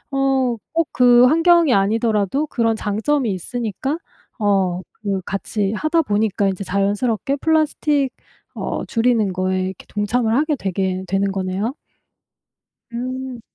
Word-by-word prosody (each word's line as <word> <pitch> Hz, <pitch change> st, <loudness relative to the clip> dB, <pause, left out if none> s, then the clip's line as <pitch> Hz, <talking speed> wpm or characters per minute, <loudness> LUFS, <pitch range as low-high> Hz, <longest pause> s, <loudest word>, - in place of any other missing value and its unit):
어 270 Hz, -3 st, +1 dB, 0.2 s
꼭 330 Hz, 0 st, +1 dB
그 245 Hz, -1 st, +6 dB
환경이 330 Hz, -1 st, +4 dB
아니더라도 215 Hz, +6 st, +1 dB
그런 230 Hz, -5 st, 0 dB
장점이 225 Hz, +5 st, 0 dB
있으니까 240 Hz, -, -3 dB, 0.4 s
어 195 Hz, -4 st, +1 dB, 0.2 s
그 195 Hz, -2 st, -2 dB
같이 195 Hz, +1 st, -2 dB
하다 310 Hz, +9 st, +1 dB
보니까 205 Hz, -4 st, 0 dB
이제 190 Hz, +1 st, -3 dB
자연스럽게 205 Hz, +7 st, 0 dB
플라스틱 300 Hz, -2 st, +1 dB, 0.4 s
어 -, -, -3 dB
줄이는 225 Hz, -4 st, +1 dB
거에 185 Hz, 0 st, -1 dB
이렇게 190 Hz, -1 st, -8 dB
동참을 220 Hz, +2 st, 0 dB
하게 300 Hz, +1 st, +1 dB
되게 190 Hz, -2 st, -2 dB
되는 195 Hz, +1 st, 0 dB
거네요. 190 Hz, +4 st, -2 dB, 1.2 s
음. 255 Hz, 0 st, -5 dB
225 Hz, 275 characters per minute, -20 LUFS, 195-265 Hz, 1.2 s, 그